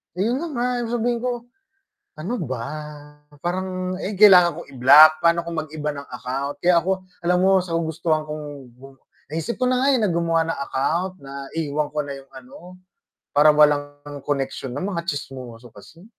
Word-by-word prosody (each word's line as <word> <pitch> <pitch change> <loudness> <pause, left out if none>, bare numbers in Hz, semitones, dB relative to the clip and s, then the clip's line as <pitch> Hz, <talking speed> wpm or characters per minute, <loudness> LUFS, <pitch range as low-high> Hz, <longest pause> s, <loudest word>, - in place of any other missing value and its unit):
Ayun 235 - -1
na - - -3
nga 245 -3 -1 0.2
yung 230 - -5
sabihin 240 0 0
ko, 245 -1 -3 0.7
ano 180 +10 -3 0.2
ba 120 -3 -3 0.7
parang, 185 +2 -3
eh, - - -3
kailangan 180 -4 +7
ko - - -5
i-block 140 +5 +8
paano 170 0 +2
kung 170 - -5
mag-iba 150 -1 -5
ng 140 0 -9
account. 140 +3 -4
Kaya 175 +2 +3
ako 190 0 -2 0.2
alam 180 +1 +2
mo 190 +1 +3
sa 175 -2 -7
kagustuhan 160 -1 -1
kong 150 0 -6 0.3
gu 135 +2 -16 0.3
naisip 165 +9 -3
ko 255 - -1
na 255 - +2
nga, 270 - +2
eh, - - +2
na 210 - +2
gumawa 165 -1 +1
ng 165 - -3
account 170 +7 -1
na 140 0 -8
iwan 150 -2 -1
ko - - -3
na 140 - -6
yung 135 0 -17
ano 135 +8 -13 0.6
parang 150 +1 +5
walang 145 -1 +1
connection 135 -2 -3
na 165 - -3
mga 185 -4 -3
tsismoso 125 -5 -7
kasi. 170 +4 -16
160 Hz, 180 wpm, -22 LUFS, 145-185 Hz, 0.7 s, i-block